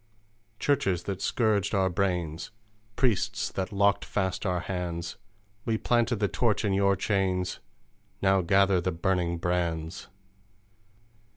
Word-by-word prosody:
"Churches 95 - +1
that 95 -1 -4
scourged 105 -3 +1
our 95 -1 +3
brains, 90 -4 -1 0.5
Priests 120 -7 0
that 95 +2 -3
locked 100 0 +2
fast 95 0 -2
our 90 -1 0
hands! 85 -2 -4 0.5
We 115 -1 0
planted 120 +1 +2
the 105 -1 +1
torch 115 0 +1
in 100 - +1
Your 100 0 +3
chains: 95 -2 0 0.6
Now 95 -1 +3
gather 95 +1 +3
the 90 +2 -1
burning 85 0 0
brands! 85 -1 -2
95 Hz, 120 wpm, -28 LUFS, 90-100 Hz, 0.6 s, our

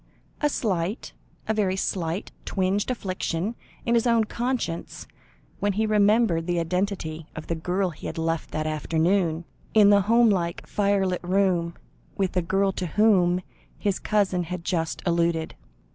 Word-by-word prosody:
A 295 - +3
slight, 195 -5 -2 0.3
a 220 - +2
very 200 -3 +1
slight, 180 -1 -2
twinge 195 +3 0
afflicted 190 -3 -2 0.3
his 235 0 +2
own 230 -1 +4
conscience, 235 -6 -3 0.5
when 205 0 +1
he 220 +3 +1
remembered 210 -5 +3
the 175 -1 +1
identity 170 -2 -2
of 160 - -6
the - - -2
girl 180 +3 -1
he 155 - -8
had - - -6
left 165 0 -1
that 155 0 -3
afternoon, 165 +2 +1 0.3
in 205 -1 +7
the 200 0 +6
home 230 +3 +4
like, 170 -3 -1
firelit 200 -3 +1
room, 180 -2 +1 0.4
with 190 -2 +1
the 180 - +1
girl 195 +3 +1
to 185 -1 -4
whom 185 -1 +3 0.4
his 200 -3 -1
cousin 190 -4 +1
had 180 0 -5
just 165 -2 -2
alluded. 170 -2 +1
185 Hz, 145 wpm, -25 LUFS, 170-205 Hz, 0.5 s, in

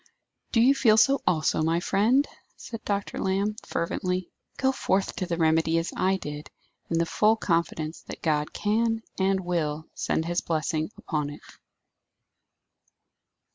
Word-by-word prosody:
"Do 230 - +4
you 260 +4 +6
feel 225 -6 +4
so, 275 +5 +4
also, 155 -2 +2
my 165 +2 +2
friend!" 220 +10 +2 0.3
said 230 -2 -8
Dr. 200 -1 -2
Lamb, 195 +2 0
fervently. 180 +2 -2 0.3
"Go 265 0 +2
forth 195 -6 0
to 185 - -2
the 170 -1 -2
remedy 160 0 +3
as 165 +1 -2
I 190 +1 +2
did, 150 -3 -7 0.4
in 165 - 0
the 165 - +2
full 215 +6 +3
confidence 165 -5 -1
that - - -8
God 150 -2 +1
can, 225 +2 0 0.2
and 190 0 +2
will, 160 -4 -2
send 160 - -1
His 175 +1 0
blessing 155 -1 -1
upon 150 -2 -2
it." 145 - -10
180 Hz, 145 wpm, -26 LUFS, 160-210 Hz, 0.4 s, you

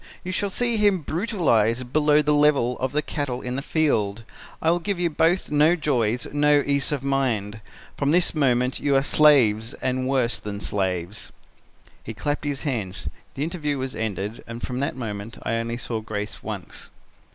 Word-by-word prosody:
You 185 - -4
shall 200 +2 -1
see 235 +3 +1
him 205 -4 +3
brutalized 130 - 0
below 150 0 +4
the 150 +1 +2
level 145 -4 +3
of 130 0 -1
the 150 +1 0
cattle 135 -4 -3
in 125 0 -3
the 135 - -2
field. 115 -10 0 0.4
I 160 - +2
will 175 - +1
give 185 +2 -2
you 175 -2 +1
both 165 +4 +1
no 150 +3 +4
joys, 125 -7 0
no 145 0 +4
ease 140 0 +1
of 140 -3 -2
mind. 115 -6 -1 0.4
From 140 - 0
this 175 +3 +3
moment 125 -4 +1
you 140 -1 +1
are 135 - +4
slaves, 125 -8 +4
and 130 0 -2
worse 130 -3 +1
than 100 -1 -6
slaves.' 95 -1 -3 0.7
"He - - -7
clapped 145 0 -2
his 145 -2 -3
hands. 110 - -3 0.3
The 140 - -2
interview 150 -3 -2
was 130 -1 -4
ended 105 -1 -4
and 115 +1 -8
from 125 0 -3
that 140 - -1
moment 110 -3 -6
I 115 - -1
only 115 +1 -3
saw 115 -2 -3
Grace 105 -1 -5
once." - - -8
135 Hz, 180 wpm, -24 LUFS, 115-150 Hz, 0.7 s, below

